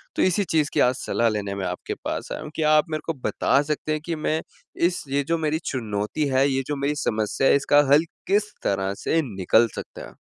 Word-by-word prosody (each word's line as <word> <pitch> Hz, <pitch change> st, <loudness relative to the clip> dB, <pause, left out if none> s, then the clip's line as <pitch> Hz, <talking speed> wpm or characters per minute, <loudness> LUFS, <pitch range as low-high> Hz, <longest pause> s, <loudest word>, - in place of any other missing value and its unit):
तो -, -, 0 dB
इसी 185 Hz, +2 st, +3 dB
चीज़ 155 Hz, -1 st, +2 dB
की -, -, +1 dB
आज 125 Hz, +1 st, +3 dB
सलाह 115 Hz, 0 st, 0 dB
लेने 100 Hz, -2 st, -3 dB
में 95 Hz, -, -3 dB
आपके 90 Hz, -, -4 dB
पास -, -, -3 dB
आया -, -, -4 dB
हूँ, 150 Hz, -, -8 dB
क्या 155 Hz, -1 st, +2 dB
आप 155 Hz, +2 st, +2 dB
मेरे 155 Hz, -, -2 dB
को 165 Hz, -, -1 dB
बता 140 Hz, -, +2 dB
सकते 150 Hz, +1 st, -3 dB
हैं 155 Hz, -, -1 dB
कि 170 Hz, -, -2 dB
मैं 155 Hz, +1 st, -1 dB, 0.5 s
इस 175 Hz, -, -4 dB
ये 140 Hz, +1 st, +1 dB
जो 165 Hz, 0 st, +1 dB
मेरी 155 Hz, 0 st, 0 dB
चुनौती 110 Hz, +3 st, -2 dB
है, 135 Hz, +1 st, +3 dB
ये 135 Hz, 0 st, 0 dB
जो 150 Hz, -, -1 dB
मेरी 140 Hz, +1 st, -1 dB
समस्या 110 Hz, +4 st, +1 dB
है -, -, +6 dB
इसका 145 Hz, +1 st, +4 dB
हल 155 Hz, +3 st, +5 dB, 0.2 s
किस 210 Hz, +2 st, +1 dB
तरह 95 Hz, 0 st, 0 dB
से 165 Hz, +10 st, 0 dB, 0.2 s
निकल 110 Hz, +5 st, +4 dB
सकता -, -, -7 dB
है? -, -, -18 dB
145 Hz, 235 wpm, -24 LUFS, 115-155 Hz, 0.5 s, है